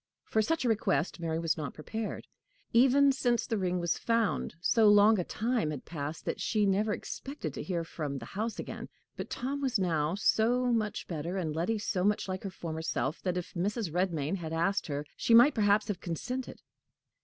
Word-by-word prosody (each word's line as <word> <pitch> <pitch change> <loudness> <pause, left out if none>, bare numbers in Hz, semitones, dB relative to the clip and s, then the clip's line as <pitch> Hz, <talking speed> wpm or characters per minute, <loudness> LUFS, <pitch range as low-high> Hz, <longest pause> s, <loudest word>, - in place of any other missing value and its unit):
For 220 - +1
such 320 +5 0
a - - +3
request 200 -6 +1
Mary 165 -1 -1
was 165 -1 0
not 150 -2 -5
prepared. 220 +8 -5 0.5
Even 270 +4 +6
since 245 -3 +1
the 225 -4 -1
ring 180 -1 0
was 170 -1 0
found, 230 -6 0
so 220 +5 +4
long 205 +1 +6
a - - +1
time 225 -4 -1
had 145 -4 -5
passed 155 -1 -5
that - - -3
she 215 -2 +1
never 200 +2 +2
expected 240 - -5
to - - -5
hear 170 +1 -2
from 150 -4 -4
the 115 - -7
house 220 - -3
again. - - -6 0.3
But - - -6
Tom 275 +3 -3
was 260 -4 +1
now 165 -3 0
so 240 +5 +2
much 215 -2 -1
better, 170 +3 -3
and 160 -5 -2
Letty 180 +8 0
so 200 -3 -1
much 205 +1 +1
like 185 0 -3
her 195 - -3
former 160 -3 -5
self, 155 -1 -2
that, 180 -1 -1
if 180 - -5
Mrs. 200 +1 -2
Redmain 175 -2 0
had 165 -3 -5
asked 170 +5 0
her, 145 -1 -3
she 230 - +3
might 250 +5 +8
perhaps 210 -1 +3
have 205 -5 -3
consented. 245 +10 -5
195 Hz, 200 wpm, -30 LUFS, 165-225 Hz, 0.5 s, might